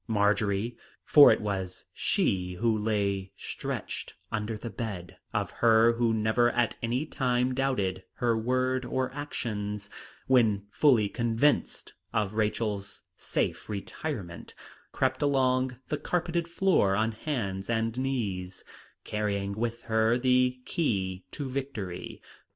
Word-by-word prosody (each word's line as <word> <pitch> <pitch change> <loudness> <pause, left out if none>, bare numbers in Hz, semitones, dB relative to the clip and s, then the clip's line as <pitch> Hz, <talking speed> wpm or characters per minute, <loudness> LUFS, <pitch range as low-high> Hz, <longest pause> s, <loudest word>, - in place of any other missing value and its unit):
Marjory, 105 +1 +1 0.3
for 145 -2 +9
it - - +2
was 95 -3 -3
she 90 -1 0
who 115 +3 +1
lay 100 -3 -1
stretched - - -5 0.2
under 110 0 -2
the 115 +1 -6
bed 100 -7 -5 0.2
of - - -1
her 115 0 +5
who 115 -1 +1
never 110 +2 +3
at 120 -2 +1
any 120 +5 0
time 125 -3 0
doubted 125 -9 0
her 120 -2 +1
word 130 +3 0
or 130 +1 -2
actions, 105 -7 -4 0.3
when 110 -6 +3
fully 120 -4 +4
convinced 120 +6 0 0.2
of 105 -1 0
Rachel's 105 -2 -1
safe - - -2
retirement, 100 - -5 0.4
crept 130 0 0
along 130 -3 +2
the 150 - 0
carpeted 170 -1 -1
floor 170 - +3
on 110 +2 +1
hands 110 -6 -3
and 115 0 0
knees, 105 -9 -2 0.4
carrying 100 -2 -2
with 115 +2 -3
her 110 +1 +2
the 125 0 +2
key 95 - -1
to 145 - -4
victory. 125 -9 -5
115 Hz, 120 wpm, -29 LUFS, 100-130 Hz, 0.4 s, for